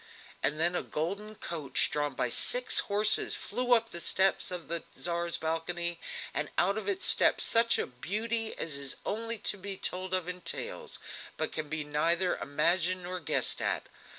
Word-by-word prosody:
And 150 +2 +2
then 170 +2 +5
a - - 0
golden 200 +7 -4
coach 155 -8 -1
drawn 145 -2 -1
by 125 - 0
six 250 - +6
horses 210 +1 +2
flew 245 +3 -1
up 230 0 -1
the 170 - -5
steps 190 +2 +2
of 180 -2 -5
the 170 0 0
Tsar's 170 0 -1
balcony, 170 +2 -2 0.3
and 150 - -2
out 195 +2 +2
of 220 - -3
it 385 -1 -2
stepped - - +4
such 230 0 +3
a - - -1
beauty 220 - -2
as 150 -4 -2
is 140 -1 -2
only 230 +2 -2
to 210 0 -2
be 195 0 -6
told 185 0 -2
of 185 -2 -2
in 180 0 -5
tales, - - -3 0.4
but 155 - -1
can 155 -2 -4
neither 155 +4 +1
be - - -11
imagined 175 +5 +2
nor 180 +1 -4
guessed 155 - +1
at. - - 0
175 Hz, 180 wpm, -30 LUFS, 160-205 Hz, 0.4 s, six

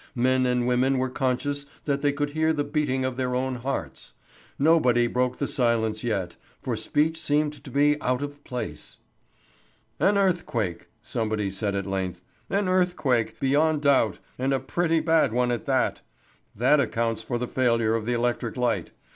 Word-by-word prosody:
Men 130 +1 +3
and 125 -1 +1
women 125 +2 +2
were 130 0 -1
conscious 140 +3 -1 0.2
that 140 -1 0
they 145 0 +3
could 145 0 -2
hear 160 +1 +1
the 145 -2 0
beating 145 -3 -1
of 130 -1 -3
their 125 -1 -1
own 130 0 -1
hearts. 120 - -5 0.4
Nobody 130 -6 +4
broke 125 +1 0
the 140 - -1
silence 115 -5 0
yet, 100 -7 -2 0.2
for 125 - -3
speech 150 +9 0
seemed 150 -1 0
to 140 - -9
be 145 +3 +2
out 125 +2 0
of 145 0 -7
place. 125 -1 -6 1.0
"An 200 +1 +3
earthquake," 125 - 0 0.2
somebody 110 -5 -2
said 100 +1 -2
at 100 -1 -2
length. 95 -2 -3 0.3
"An 200 0 0
earthquake, 180 -10 +1
beyond 150 +3 +2
doubt, 130 -9 +3 0.2
and 135 +2 +1
a 135 - +1
pretty 165 +4 0
bad 160 -6 +3
one 125 0 +1
at 120 - -3
that. 130 -3 +1 0.5
That 130 +7 +4
accounts 115 -4 0
for 120 +2 -3
the 125 +1 -3
failure 115 -4 +1
of 115 -1 -2
the 120 - +1
electric 120 -1 -1
light. 125 -2 -1
130 Hz, 170 wpm, -25 LUFS, 115-145 Hz, 1.0 s, Nobody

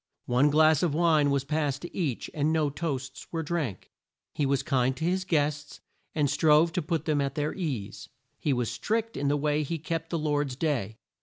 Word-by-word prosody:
One 125 +4 +3
glass 155 0 +5
of 165 -5 +1
wine 160 -3 +4
was 140 -1 +1
passed 145 -1 -1
to 175 - -8
each, 150 -10 -2
and 150 +1 +1
no 155 -3 +1
toasts 135 -4 -4
were 165 -1 -2
drank. 150 - -3 0.4
He 145 - 0
was 135 -1 +1
kind 130 -2 +1
to 160 - -2
his 185 +2 0
guests 145 -3 -1 0.4
and 150 -2 +2
strove 155 +3 +4
to 180 - 0
put 160 0 -2
them 150 -2 +1
at 140 0 -2
their 150 0 -1
ease. 135 - -4 0.3
He 150 - 0
was 125 -3 0
strict 225 - -2
in 140 - -1
the 145 +1 +2
way 150 +1 +1
he 160 +3 -2
kept 165 +1 -4
the 170 - -1
Lord's 145 -3 0
day. 125 -8 -1
150 Hz, 205 wpm, -28 LUFS, 140-160 Hz, 0.4 s, glass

